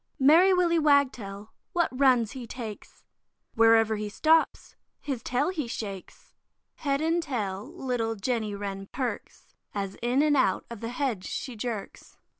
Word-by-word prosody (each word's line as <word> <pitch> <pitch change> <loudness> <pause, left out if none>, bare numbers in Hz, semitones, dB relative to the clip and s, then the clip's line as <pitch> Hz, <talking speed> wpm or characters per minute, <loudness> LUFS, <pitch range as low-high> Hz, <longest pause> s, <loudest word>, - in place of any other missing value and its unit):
Merry 325 +8 +6
Willy 350 -2 +3
Wagtail, 250 -9 +1 0.2
what 345 -2 +2
runs 255 -4 +3
he 255 -4 -7
takes! 225 -3 -8 0.5
Wherever 225 -1 +4
he 210 0 -4
stops, 320 +9 +2 0.2
his 270 -5 -4
tail 255 +7 0
he 310 -9 -3
shakes. 200 -5 -7 0.4
Head 280 -1 -1
and 330 +2 +1
tail 215 - -4
little 245 -9 -2
Jenny 220 -1 -2
Wren 195 -1 -5
perks, 255 -2 -5 0.2
As 195 -1 -3
in 245 +4 +2
and 300 -1 +3
out 195 -9 +2
of 235 - -7
the 230 - -4
hedge 245 -7 -2
she 255 - -5
jerks. 220 -2 -6
245 Hz, 145 wpm, -27 LUFS, 215-285 Hz, 0.5 s, Merry